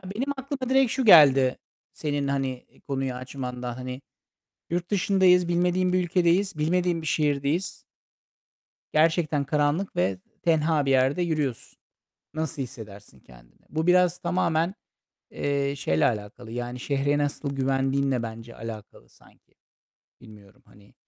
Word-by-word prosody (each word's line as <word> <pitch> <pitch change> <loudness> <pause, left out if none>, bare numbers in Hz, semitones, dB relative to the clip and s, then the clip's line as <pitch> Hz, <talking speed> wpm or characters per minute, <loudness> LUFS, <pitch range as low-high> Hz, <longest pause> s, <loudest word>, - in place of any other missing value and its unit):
Benim 270 +5 -1
aklıma 265 -1 -5
direkt 265 -2 +3
şu 260 -3 -1
geldi 135 -8 +7 0.4
senin, 145 -2 -2
hani, 135 -2 -2 0.2
konuyu 135 -2 -2
açmanda, 125 -1 -6
hani, 130 +1 -6 0.7
yurt 175 +2 -2
dışındayız, 185 -2 +3
bilmediğin 180 +1 +1
bir 185 -1 +2
ülkedeyiz, 175 0 +1
bilmediğin 170 +1 0
bir - - -7
şehirdeyiz. 150 +4 0 1.2
Gerçekten 155 -2 +2
karanlık 150 +6 0
ve 95 +1 0 0.2
tenha 160 -3 +2
bir 135 - +1
yerde 135 +6 +2
yürüyorsun. 150 -8 -3 0.5
Nasıl 155 -3 -3
hissedersin 105 - -10
kendini? - - -20
Bu 160 +3 -2
biraz 180 -1 +4
tamamen, 175 0 0 0.5
eee, 140 0 -1
şeyle 80 - +1
alakalı. 110 +1 -3
Yani, 120 +1 -5
şehre 145 +2 0
nasıl 145 -1 -2
güvendiğinle 135 -1 0
bence 115 +1 -8
alakalı 110 -2 -9
sanki. - - -25 0.7
Bilmiyorum, 105 -2 -16
hani. 100 0 -21
145 Hz, 120 wpm, -25 LUFS, 125-175 Hz, 1.2 s, geldi